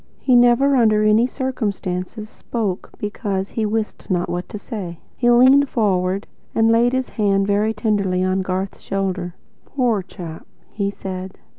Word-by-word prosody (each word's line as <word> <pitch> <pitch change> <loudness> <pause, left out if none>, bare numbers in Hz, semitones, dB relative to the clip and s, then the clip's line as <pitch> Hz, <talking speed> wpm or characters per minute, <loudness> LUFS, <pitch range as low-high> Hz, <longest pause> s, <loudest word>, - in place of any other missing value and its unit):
He 255 - +2
never, 245 +3 +5
under 215 -4 +4
any 215 +3 +4
circumstances, 215 -6 -3
spoke 215 -4 -4
BECAUSE 200 -2 -3
he 220 -2 -1
wist 215 0 -3
not 180 -2 0
what 175 +1 -4
to - - -6
say. 200 -6 -6 0.2
He 240 - +2
leaned 260 +4 +6
forward 195 -3 0 0.3
and 225 0 +4
laid 240 +2 +3
a 260 - +1
hand 195 -2 +1
very 210 +2 +1
tenderly 200 -4 0
on 185 +1 +1
Garth's 190 +1 -3
shoulder. 185 -2 -3 0.3
"Poor 245 -7 0
chap," 175 -3 -9 0.2
he 200 -2 -1
said. 190 -1 -6
210 Hz, 150 wpm, -20 LUFS, 190-230 Hz, 0.3 s, leaned